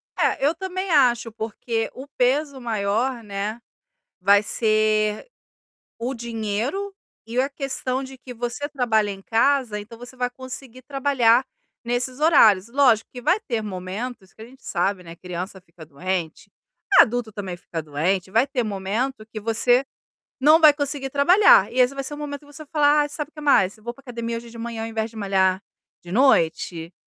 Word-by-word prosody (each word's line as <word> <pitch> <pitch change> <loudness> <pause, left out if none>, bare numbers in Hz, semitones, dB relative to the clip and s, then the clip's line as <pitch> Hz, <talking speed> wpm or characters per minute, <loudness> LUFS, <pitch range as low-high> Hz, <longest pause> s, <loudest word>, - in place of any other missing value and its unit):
É, 275 - +1
eu 305 - +3
também 375 +1 -4
acho, 240 -5 +3
porque 225 +1 -3
o 265 +2 -10
peso 270 +2 +1
maior, 230 +2 -1
né, 205 +3 -4 0.6
vai 200 +2 +5
ser 215 - +1 0.7
o 250 +3 -2
dinheiro 235 - -3 0.3
e 235 +2 -2
a 270 +2 +1
questão 270 -2 -3
de 265 0 -10
que 250 0 -10
você 245 +4 -4
trabalha 225 -6 +1
em 195 0 -9
casa, 235 -1 +1
então 225 +3 -11
você 245 +2 -11
vai 250 -1 -1
conseguir 255 0 -9
trabalhar 265 -3 +2 0.4
nesses 245 +2 -1
horários, 225 - +5
lógico 245 -4 +3
que 245 - -9
vai 365 - +2
ter 235 - -2
momentos 200 +2 -6
que 220 - -16
a - - -8
gente, 260 +2 -18
sabe, 185 +1 -1
né, 165 0 -10
criança 180 +2 -7
fica 165 -2 -15
doente, 165 +2 -4 0.5
adulto 235 -1 +4
também 195 -4 -6
fica 165 -2 -6
doente, 175 +6 -1
vai 230 +6 +3
ter 255 -3 -1
momento 215 +4 -3
que 220 -1 -7
você 230 +4 +2 0.6
não 305 +4 +6
vai 305 -2 +8
conseguir 285 -2 -3
trabalhar 375 - +5
e 255 - -2
esse 250 +2 +4
vai 275 0 -4
ser 295 - -4
um - - -7
momento 290 -1 -5
que - - -19
você 290 +2 -11
vai 285 - -23
falar: 295 -1 +4
"Ai, 290 - -1
sabe 300 0 -5
o - - -42
que 300 - -10
mais? 205 -9 +3
Eu 215 - -22
vou 240 +1 -5
para 275 - -19
academia 235 -3 -4
hoje 235 0 -9
de 230 - -12
manhã 230 -1 -5
ao 225 - -3
invés 225 0 -3
de 225 - -13
malhar 190 -2 +1 0.4
de 175 - -11
noite, 170 -8 +2
235 Hz, 185 wpm, -23 LUFS, 210-270 Hz, 0.7 s, vai